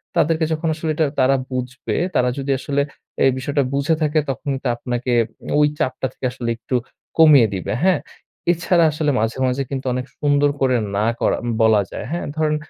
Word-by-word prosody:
তাদেরকে 160 +1 +2
যখন 160 +1 -2
আসলে 155 0 -2
এটা 160 - +2
তারা 135 +1 +4 0.2
বুঝবে 130 +1 -3 0.2
তারা 125 - +3
যদি 140 0 -2
আসলে 140 0 0 0.4
এই 135 - +5
বিষয়টা 140 +2 0
বুঝে 140 +4 +1
থাকে 155 0 +2
তখন 135 +1 -4
কিন্তু 135 0 -3
আপনাকে 125 +1 -3 0.5
ওই 150 - +5
চাপটা 130 0 -1
থেকে - - -6
আসলে 125 -2 -4
একটু 125 +3 -4 0.4
কমিয়ে 150 -7 +7
দিবে, 95 - -3
হ্যাঁ? 185 -5 +4 0.5
এছাড়া 175 0 +2
আসলে 150 -1 0
মাঝে, 115 +3 -1
মাঝে 130 +2 0 0.3
অনেক 125 0 -2
সুন্দর 145 0 +3
করে 130 -1 +3 0.2
না 105 +2 +1
করা - - +1 0.2
বলা 110 -2 +5
যায়, - - -6
হ্যাঁ? 170 - -2
ধরেন 155 -1 +1
140 Hz, 175 wpm, -20 LUFS, 125-155 Hz, 0.5 s, কমিয়ে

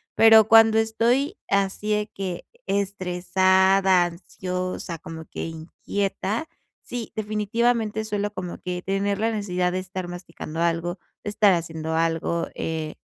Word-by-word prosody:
Pero, 220 -1 +7
cuando 225 0 +7
estoy 235 - +1
así 200 +2 0
de 210 0 +1
que 185 -3 -5 0.2
estresada, 190 -1 +3
ansiosa, 180 0 -5
como 160 0 -8
que - - -6
inquieta, 195 - -3 0.4
sí, 240 -2 -6
definitivamente, 220 +1 0
suelo 205 -1 -2
como 185 -3 -6
que 180 -1 -4
tener 195 +1 0
la 225 +1 +1
necesidad 180 -4 -1
de 185 - -1
estar 185 -1 -5
masticando 175 -2 -7
algo, 170 +1 0 0.2
de - - -3
estar 205 -1 +5
haciendo 160 -2 -3
algo, 165 +1 0
eh, 160 -1 -3
190 Hz, 130 wpm, -24 LUFS, 175-210 Hz, 0.4 s, Pero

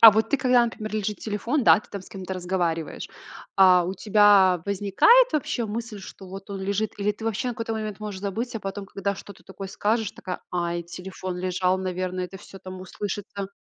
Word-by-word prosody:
А 225 - +13
вот 220 +2 +1
ты, - - +4
когда, 250 -2 +4
например, 215 -2 -5
лежит 210 -1 -2
телефон, 230 +7 -1
да, - - +8
ты - - -21
там 200 -2 -6
с - - -15
кем-то 190 -1 -6
разговариваешь, 175 -3 -2 0.5
а 185 -2 +7
у 185 +2 -3
тебя 200 -5 +5
возникает 205 - +5
вообще 250 -5 0
мысль, 220 -1 -5
что 190 0 -11
вот 195 +2 -9
он 195 -1 -4
лежит, 200 +2 -1
или 205 +1 +1
ты 220 +2 -10
вообще 225 +3 -1
на 240 - -3
какой-то 230 -1 -3
момент 215 -2 -4
можешь 205 -3 -5
забыть, 225 +5 -3
а - - -6
потом, 195 0 -5
когда 200 +1 -2
что-то 200 +1 -12
такое 190 0 -8
скажешь, 215 +1 0
такая: 180 - -6
"Ай, 175 -1 -1
телефон 180 +1 -6
лежал, 185 0 +1
наверное, 185 0 -2
это 180 +2 -8
всё 195 - -12
там 185 0 -9
услышится?" 200 +1 -5
200 Hz, 205 wpm, -25 LUFS, 185-215 Hz, 0.5 s, А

